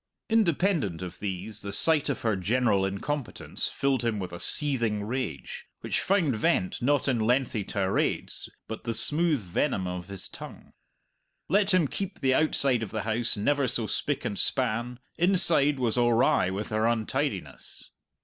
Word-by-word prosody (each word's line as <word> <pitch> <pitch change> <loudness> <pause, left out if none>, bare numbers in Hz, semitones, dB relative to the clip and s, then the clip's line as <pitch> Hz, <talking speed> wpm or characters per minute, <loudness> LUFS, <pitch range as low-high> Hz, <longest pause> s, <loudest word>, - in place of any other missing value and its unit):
Independent 170 - +1
of 90 -1 -8
these, 100 +2 -5
the 100 - -5
sight 150 +8 +3
of 140 - -2
her 110 -3 +1
general 100 0 +1
incompetence 120 +7 -3
filled 135 -2 0
him 115 -2 0
with 90 -3 -5
a 85 - -6
seething 115 - 0
rage, 110 - -5
which - - -1
found 175 - +1
vent 95 -3 0
not 145 +3 +1
in 125 -4 +1
lengthy 120 -1 +1
tirades 95 -1 -1 0.2
but 110 - -7
the 115 -1 -2
smooth 150 +3 +2
venom 95 +3 -1
of 90 -1 -5
his 100 -2 -8
tongue. - - -11 0.8
Let 200 +3 +3
him 180 -5 +3
keep 195 +6 -4
the 130 -1 +2
outside 135 -4 +3
of 110 - -4
the 110 0 -4
house 110 +1 +2
never 140 +6 +1
so 120 -2 0
spick - - -2
and - - -2
span, 120 +3 0 0.2
inside 170 -6 +3
was 125 -2 0
awry 120 -5 +3
with 100 +3 -4
her 110 +1 +1
untidiness. 115 -2 -3
120 Hz, 160 wpm, -27 LUFS, 105-145 Hz, 0.8 s, sight